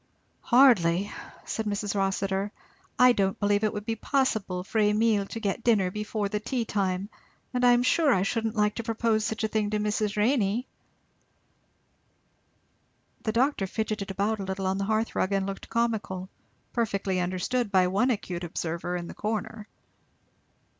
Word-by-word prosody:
"Hardly," 205 -8 +4 0.3
said 220 -1 -3
Mrs. 205 0 -2
Rossitur. 195 0 -1 0.5
"I 250 +1 +7
don't 195 -4 0
believe 205 0 +2
it 215 - +2
would 210 0 -6
be 225 - -1
possible 220 -8 0
for 220 +3 -2
Emile 210 -1 +3
to 225 - -6
get 215 +1 -2
dinner 200 -6 +3
before 210 0 -2
the 210 +1 -2
tea 235 +2 -2
time; 195 -2 -1 0.5
and 250 0 0
I 245 0 +7
am 240 0 +3
sure 305 +3 +3
I 190 -6 +3
shouldn't 225 +2 -1
like 210 -1 +2
to 230 - -5
propose 225 -1 0
such 220 +1 -2
a - - +2
thing 215 -1 0
to 210 - 0
Mrs. 210 0 -1
Renney." 225 0 +2 2.6
The 220 - -1
doctor 235 -3 +1
fidgeted 215 0 -3
about 205 +3 -1
a - - -3
little 190 0 -3
on 190 +1 0
the 200 - -1
hearth 220 +2 0
rug 190 - 0
and 195 -1 +1
looked 195 0 -6
comical, 215 -5 -1 0.4
perfectly 200 -5 0
understood 185 +6 -1
by 185 -2 +4
one 200 +8 +2
acute 185 -7 -2
observer 170 +1 -3
in 175 - -5
the - - -8
corner. 220 0 -4
210 Hz, 165 wpm, -27 LUFS, 195-225 Hz, 2.6 s, I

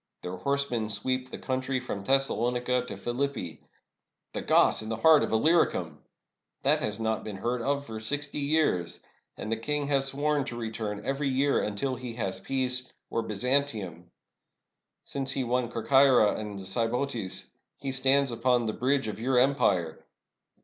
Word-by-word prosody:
Their 90 +1 -5
horse 140 +6 0
men 110 -3 -1
sweep 130 +5 -1
the - - -6
country 130 0 -2
from 100 -5 -5
Thessalonica 125 0 +1
to - - -6
Philippi. 120 - -3 0.7
The - - -3
Goths - - +4
in 110 - -6
the 110 - -1
heart 155 +6 +6
of - - -1
Illyricum! 110 - +2 0.6
That - - +4
has 105 +1 -2
not 110 -1 -1
been 105 -2 -6
heard 120 +4 -1
of 140 +3 -1
for 110 -3 -6
sixty 145 +6 -3
years. 140 - +1 0.4
And 110 - -5
the 115 - +1
king 145 +6 -1
has 135 -1 +2
sworn 145 +1 0
to 120 - -6
re 115 -2 -4
turn 105 -2 -4
every 135 +1 0
year 135 +2 +2
until 115 +6 -2
he 125 -2 -6
has 95 -5 -2
peace 125 +3 -2
— - - -57
or 115 - 0
Byzantium 110 - -1
I - - -31 1.0
Since 135 -1 -3
he 135 - -1
won 125 0 0
Corcyra 125 -1 +4
and 105 -2 -5
the 95 - -8
Sybotes, 115 0 -2 0.3
he 135 - -4
stands 135 +1 +2
upon 120 +1 +2
the 110 - -1
bridge 130 -1 +1
of 105 -1 -5
your 125 +2 +1
empire. 100 - +2
125 Hz, 170 wpm, -28 LUFS, 110-135 Hz, 1.0 s, heart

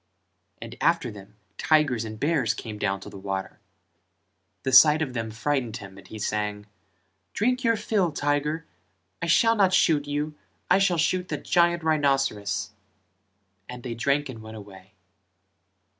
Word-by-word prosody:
And - - -8
after - - +2
them 100 0 -13 0.2
tigers 145 -8 +2
and 110 -1 -8
bears 145 -6 +1
came 105 -2 -7
down 95 -1 -1
to - - -9
the 100 - -10
water: 95 +1 -5 1.0
the 130 - -1
sight 150 +4 +8
of 140 -5 -2
them 115 -2 -3
frightened 120 0 -2
him 95 -1 -11
and 100 - -14
he 110 - -9
sang: 105 -1 -2 0.7
"Drink 250 +4 0
your 230 -1 +3
fill, 210 -5 0
tiger, 150 +2 -1 0.6
I - - -2
shall 225 +7 +4
not 195 -3 +3
shoot 150 -3 +3
you. 145 +1 -2 0.4
I 190 - +6
shall 185 -3 +2
shoot 180 +3 0
the - - -3
giant 170 -1 +2
rhinceros." 135 -10 0 1.0
and 125 -1 -8
they 120 - -4
drank 140 +5 0
and 120 -4 -9
went 110 0 -9
away. 95 -2 -14
140 Hz, 155 wpm, -25 LUFS, 110-160 Hz, 1.0 s, sight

